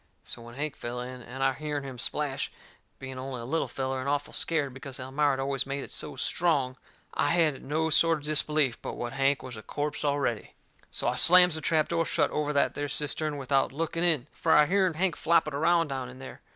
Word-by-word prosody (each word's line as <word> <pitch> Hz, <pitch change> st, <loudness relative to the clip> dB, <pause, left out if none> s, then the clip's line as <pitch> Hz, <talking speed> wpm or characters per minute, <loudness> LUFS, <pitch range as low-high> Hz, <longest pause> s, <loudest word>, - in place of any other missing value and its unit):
So 120 Hz, -, -6 dB
when 120 Hz, 0 st, -11 dB
Hank 145 Hz, +1 st, -4 dB
fell 120 Hz, +1 st, -5 dB
in, 125 Hz, +1 st, -7 dB
and 130 Hz, +3 st, -6 dB
I 135 Hz, 0 st, +3 dB
hearn 150 Hz, 0 st, -4 dB
him 130 Hz, -3 st, -8 dB
splash, 140 Hz, +1 st, -1 dB, 0.5 s
being 130 Hz, -1 st, -8 dB
only 130 Hz, -1 st, -5 dB
a -, -, -7 dB
little 160 Hz, +6 st, -1 dB
feller, 130 Hz, 0 st, -3 dB
and 130 Hz, +2 st, -3 dB
awful 145 Hz, 0 st, -2 dB
scared 150 Hz, -5 st, 0 dB
because 130 Hz, 0 st, -9 dB
Elmira 135 Hz, +3 st, 0 dB
had 135 Hz, -, -3 dB
always 135 Hz, 0 st, -1 dB
made 140 Hz, 0 st, -3 dB
it -, -, -10 dB
so -, -, -4 dB
strong, 140 Hz, -7 st, +1 dB, 0.4 s
I -, -, +1 dB
hadn't 160 Hz, -5 st, +2 dB
no 160 Hz, +2 st, 0 dB
sort 160 Hz, -1 st, +3 dB
of 155 Hz, -1 st, +4 dB
unbelief 150 Hz, -5 st, 0 dB
but -, -, -5 dB
what 120 Hz, +1 st, -4 dB
Hank 135 Hz, +1 st, +1 dB
was 130 Hz, -2 st, -7 dB
a 110 Hz, -, -8 dB
corpse 145 Hz, +7 st, -3 dB
already. 140 Hz, -6 st, -1 dB, 0.3 s
So -, -, 0 dB
I -, -, +2 dB
slams 180 Hz, 0 st, +7 dB
the 160 Hz, -, +1 dB
trap 155 Hz, +2 st, +2 dB
door 165 Hz, -1 st, 0 dB
shut -, -, +1 dB
over 150 Hz, -1 st, -1 dB
that 140 Hz, -1 st, +2 dB
there 145 Hz, 0 st, -3 dB
cistern 150 Hz, +1 st, 0 dB
without 135 Hz, 0 st, +1 dB
looking 165 Hz, +3 st, -2 dB
in, 160 Hz, -8 st, +3 dB
fur 160 Hz, -, +1 dB
I 150 Hz, -, +7 dB
hearn 185 Hz, 0 st, +1 dB
Hank 180 Hz, 0 st, 0 dB
flopping 160 Hz, -2 st, +2 dB
around 165 Hz, +2 st, +2 dB
down 130 Hz, -2 st, -4 dB
in 130 Hz, -, -12 dB
there. 130 Hz, 0 st, -10 dB
145 Hz, 225 wpm, -28 LUFS, 130-155 Hz, 0.5 s, slams